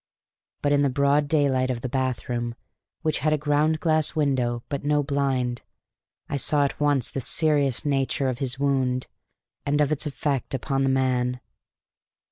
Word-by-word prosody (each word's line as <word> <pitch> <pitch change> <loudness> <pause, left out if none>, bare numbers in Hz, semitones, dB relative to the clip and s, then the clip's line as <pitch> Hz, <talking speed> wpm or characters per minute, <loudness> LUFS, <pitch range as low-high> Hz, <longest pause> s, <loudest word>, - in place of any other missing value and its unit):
But 145 - +2
in 145 0 +4
the 140 - +3
broad 140 +2 +2
daylight 140 -4 +2
of 120 -2 -2
the 130 - -3
bathroom, 120 -2 -2 0.5
which 155 -2 0
had 155 +3 +1
a - - +2
ground 150 +2 +1
glass 155 -2 +1
window 125 -6 0
but 140 -2 -4
no 145 0 +2
blind, 135 -4 -1 0.7
I 140 - -2
saw 145 +1 +2
at 140 - -4
once 145 -4 +1
the 135 - -3
serious 145 -2 +1
nature 135 -1 0
of 130 -1 -2
his 130 -2 -2
wound 130 -2 0 0.6
and 145 +1 0
of 150 0 +2
its 155 0 -1
effect 140 -2 -2
upon 135 +2 -1
the 135 - +2
man. 125 -1 +1
140 Hz, 165 wpm, -25 LUFS, 130-145 Hz, 0.7 s, in